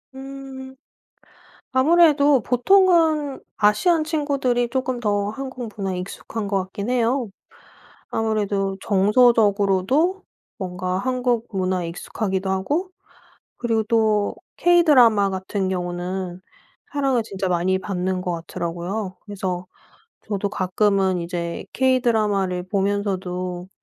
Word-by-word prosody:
음. 265 -1 -9 1.0
아무래도 290 -1 +5
보통은 315 - +3 0.2
아시안 310 - +3
친구들이 280 -6 0
쪼끔 260 -1 -2
더 205 -3 0
한국 255 0 -6
문화에 195 -3 -3
익숙한 205 +3 -6
것 200 0 0
같기는 200 +5 -4
해요. 245 0 +1 0.8
아무래도 205 -3 -1
정서적으로도 210 - +3 0.3
뭔가 185 -1 -3
한국 245 +1 0
문화에 185 -3 -1
익숙하기도 190 +2 -3
하고 285 - -1 0.7
그리고 230 -2 0
또 220 -3 +2 0.2
K-드라마 255 - +5
같은 190 +1 -2
경우는 180 0 -3 0.5
사랑을 270 -5 +1
진짜 195 -3 -3
많이 180 +1 +1
받는 185 -1 -2
것 180 - -3 0.2
같더라고요. 180 +4 -4
그래서 185 -3 -4 0.6
저도 205 -1 -2
가끔은 190 -1 +1
이제 170 -1 -4
K-드라마를 215 -8 +1
보면서도 185 -3 -2
210 Hz, 260 characters per minute, -22 LUFS, 190-260 Hz, 1.0 s, 아무래도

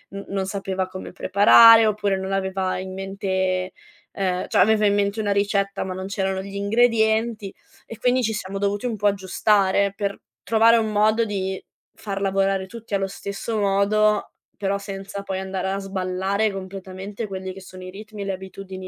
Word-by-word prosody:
n 200 - -6
non 195 -1 -2
sapeva 190 -1 -3
come 185 0 -8
preparare, 225 +3 +7
oppure 205 -2 +1
non 190 0 -4
aveva 190 -1 -1
in 190 0 -6
mente, 190 -1 -2 0.4
ehm, 185 -2 -1
cioè - - -1
aveva 215 -1 +4
in 200 - +2
mente 200 +1 0
una 205 -2 0
ricetta 200 0 0
ma 185 -1 -4
non 190 +1 -5
c'erano 195 -1 -2
gli 200 +1 -9
ingredienti, 220 0 +1 0.3
e 230 - -10
quindi 250 0 +2
ci 220 -1 0
siamo 195 -2 -5
dovuti 200 +4 -1
un 230 - -2
po' 210 0 -5
aggiustare 200 0 +2
per 200 -1 -3 0.2
trovare 230 +1 +4
un 220 -1 0
modo 215 +2 +3
di 190 -3 -3 0.3
far 195 -2 -5
lavorare 195 -1 +1
tutti 225 0 -6
allo 195 0 0
stesso 200 +3 -4
modo, 205 +1 +2 0.3
però 200 0 0
senza 195 0 -7
poi 190 -1 -3
andare 190 0 -3
a 195 +1 -2
sballare 195 +2 -1
completamente 195 +2 -7
quelli 190 -1 -6
che 195 - -11
sono 185 0 -11
i 185 - -7
ritmi 210 +1 -8
e - - -6
le 195 - -2
abitudini 190 0 -8
195 Hz, 180 wpm, -23 LUFS, 190-210 Hz, 0.4 s, preparare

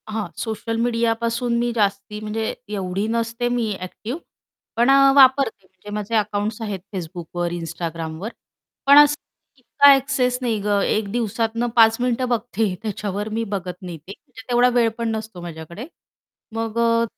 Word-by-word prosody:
हां. 215 -4 -3
सोशल 225 +1 -3
मीडियापासून 235 0 0
मी 240 0 0
जास्ती, 205 0 -1
म्हणजे 215 +1 -2 0.2
एवढी 195 +1 -2
नसते 230 +1 -1
मी 240 -3 0
ॲक्टिव्ह. 215 - -6 0.6
पण 235 +3 +3
अ, 275 0 +7
वापरते 260 -7 +5
म्हणजे 190 +2 -15
माझे 210 +2 -2
अकाउंट्स 210 +1 -1
आहेत 205 -3 -3 0.2
Facebookवर, 175 0 -4
Instagramवर. 165 +2 -5 0.6
पण 280 +1 +8
असं 295 0 +7 0.4
इतका 270 +3 +4
ॲक्सेस 270 -2 +2
नाही 230 -4 0
गं, 205 0 +1
एक 210 -1 0
दिवसातनं 230 +1 -1
5 225 -1 +6
मिनिटं 250 +1 0
बघते 225 -3 0
त्याच्यावर 210 -1 -3
मी 225 +1 -2
बघत 185 -2 -3
नाही. 175 -3 -7
ते 160 +5 -13
म्हणजे 255 -6 -15
तेवढा 245 +1 +5
वेळ 235 -2 +4
पण 230 -1 -1
नसतो 220 -4 -7
माझ्याकडे. 170 +5 -8 0.7
मग 225 0 -3
अ, 230 0 +3
225 Hz, 150 wpm, -22 LUFS, 200-240 Hz, 0.7 s, पण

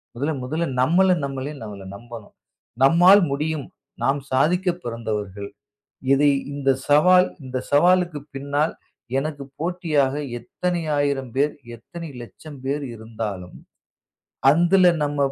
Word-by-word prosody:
முதல்ல 145 +5 -1
முதல்ல 155 +6 -2
நம்மள 180 +6 +4
நம்மளே 135 +2 -5
நம்மள 100 -3 -8
நம்பணும். 115 -1 -11 0.5
நம்மால் 180 +6 +7
முடியும். 150 0 -2 0.4
நாம் 140 +1 +2
சாதிக்கப் 180 +6 +1
பிறந்தவர்கள். 105 -4 -4 0.6
இதை 145 +1 +4 0.2
இந்தச் 135 -2 0
சவால், 180 +5 +5 0.2
இந்தச் 130 0 -5
சவாலுக்குப் 170 -1 +3
பின்னால் 145 +3 -1 0.4
எனக்குப் 140 -2 -5
போட்டியாக 160 -6 0 0.3
எத்தனை 180 -2 -3 0.2
ஆயிரம் 135 -4 -1
பேர், 145 +2 +2 0.2
எத்தனை 165 +8 -9
லட்சம் 145 +4 -12
பேர் 145 +2 -1
இருந்தாலும் 105 -5 -6 0.9
அதுல 175 +4 +4 0.2
நம்ம 145 0 -2
145 Hz, 110 wpm, -23 LUFS, 130-170 Hz, 0.9 s, நம்மால்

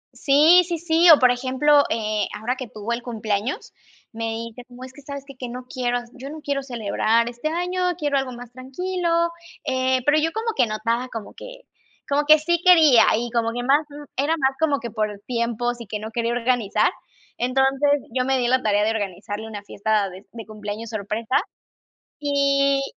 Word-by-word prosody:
Sí, 310 +6 +5
sí, 345 -1 -2
sí, 335 +1 +3
o, 315 - +10
por 255 -2 +5
ejemplo, 260 +4 +3
eh, 215 -1 -1
ahora 240 +4 -2
que 255 -1 -7
tuvo 215 +1 -5
el 235 - -3
cumpleaños, 220 0 -3 0.4
me 230 0 -5 0.2
dice 230 +2 -11
como: 245 +1 -13
"Es 260 0 -10
que 285 - -14
¿sabes 280 0 -7
que? 275 -1 -12
que 250 -1 -7
no 250 +1 -7
quiero 245 -1 -1 0.2
yo 270 +1 -9
no 310 +2 -8
quiero 280 -1 -2
celebrar 230 -2 0
este 240 +5 -5
año, 355 +3 -2 0.2
quiero 290 -4 0
algo 265 -1 -4
más 245 -1 -10
tranquilo". 340 +8 -4 0.6
Eh, 260 0 0
pero 295 +1 +4
yo 325 +2 0
como 445 +5 -3
que 250 - +3
notaba 230 +3 -2
como 225 -4 -8
que - - -11 0.5
como 290 +1 +1
que 310 +1 +8
sí 340 +2 0
quería, 315 -10 +7
y 240 +1 -3
como 230 -1 0
que 245 +1 -3
más 285 +4 +2
n 290 0 -10
era 295 +5 +1
más 265 -3 +2
como 295 -3 +1
que 235 -1 -7
por 210 -2 -3
tiempos 240 0 -2
y 230 - -9
que 210 - -4
no 215 +1 -7
quería 235 +1 -1
organizar. 240 -3 +1 0.5
Entonces, 270 +3 +2 0.2
yo 255 0 +1
me 265 +1 +1
di 250 - 0
a - - +1
la 260 0 +3
tarea 205 -2 +2
de 220 - +1
organizarle 205 0 -4
una 210 -2 -8
fiesta 205 0 -1
de 185 +2 -13
de 225 -2 -9
cumpleaños 215 +1 -7
sorpresa 215 +3 -1 0.8
y 280 -1 +2
250 Hz, 200 wpm, -22 LUFS, 225-285 Hz, 0.8 s, o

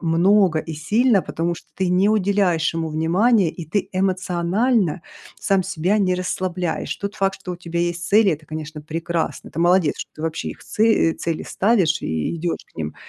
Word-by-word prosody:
много 175 +1 +3
и 160 - -5
сильно, 205 - +2
потому 170 +1 -2
что - - -14
ты 190 -1 0
не 185 +3 +3
уделяешь 195 -6 +2
ему 165 -1 -2
внимания, 180 +6 +2
и 170 +1 -7
ты 195 +6 -2
эмоционально 185 - 0 0.4
сам 195 -1 +1
себя 190 +3 0
не 185 -2 +1
расслабляешь. 180 -1 -2
Тот 200 +1 -5
факт, 195 0 -1
что 180 -2 -5
у - - -6
тебя 170 -1 -5
есть 175 0 -2
цели- 210 -1 +5
это, 155 +1 -6
конечно, 155 0 -7
прекрасно, 165 +2 -3
ты 165 - -3
молодец, 175 -3 +3
что - - -6
ты 155 - -8
вообще 160 0 -3
их - - -9
це 215 - -2
э, 220 -7 +4
цели 165 -2 -3
ставишь 190 -7 +1
и 80 - -2
идешь 170 +1 -3
к - - -32
ним. 75 -1 -4
175 Hz, 190 wpm, -21 LUFS, 165-195 Hz, 0.4 s, цели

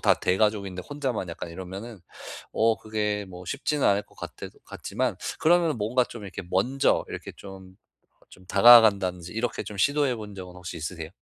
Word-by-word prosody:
다 - - +5
대가족인데 100 -1 0
혼자만 135 -10 -3
약간 85 0 -6
이러면은 95 +5 -8 0.5
어 115 0 +3
그게 105 -1 -2
뭐 90 0 -10
쉽지는 140 - -1
않을 100 +1 +3
것 - - -25
같아 - - -8 0.2
같지만 - - -3 0.2
그러면은 170 -2 +3
뭔가 120 +5 +2
좀 120 -3 -10
이렇게 95 - -7
먼저 125 +9 +2
이렇게 - - -7
좀 95 -1 -12 0.5
좀 90 - -16
다가간다든지 100 -5 +6
이렇게 115 +2 -2
좀 105 - -8
시도해 140 +2 +2
본 105 -2 -8
적은 90 -2 -9
혹시 90 -2 -7
있으세요? 80 0 -5
105 Hz, 370 characters per minute, -26 LUFS, 95-120 Hz, 0.5 s, 다가간다든지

